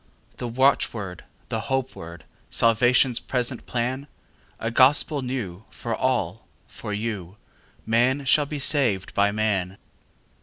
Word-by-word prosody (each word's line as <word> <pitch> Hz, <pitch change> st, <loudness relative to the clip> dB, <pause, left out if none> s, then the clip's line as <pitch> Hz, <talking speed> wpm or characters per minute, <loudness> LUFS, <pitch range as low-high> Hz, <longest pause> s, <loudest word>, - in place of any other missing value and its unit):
The 125 Hz, -, -4 dB
watchword, 115 Hz, -7 st, +1 dB, 0.2 s
the 110 Hz, -, -1 dB
hope 130 Hz, +3 st, -2 dB
word, 85 Hz, 0 st, -9 dB, 0.3 s
Salvation's 120 Hz, +2 st, +3 dB
present 125 Hz, -1 st, -2 dB
plan?A 125 Hz, -2 st, -5 dB
gospel 140 Hz, +4 st, +4 dB
new, 110 Hz, -7 st, -4 dB
for -, -, -4 dB
all—for 105 Hz, -, -3 dB
you:Man 115 Hz, +5 st, -2 dB
shall 145 Hz, +2 st, +4 dB
be 150 Hz, -, -4 dB
saved 130 Hz, -9 st, +1 dB
by 100 Hz, 0 st, +3 dB
man. 100 Hz, -3 st, 0 dB
120 Hz, 105 wpm, -25 LUFS, 105-130 Hz, 0.3 s, gospel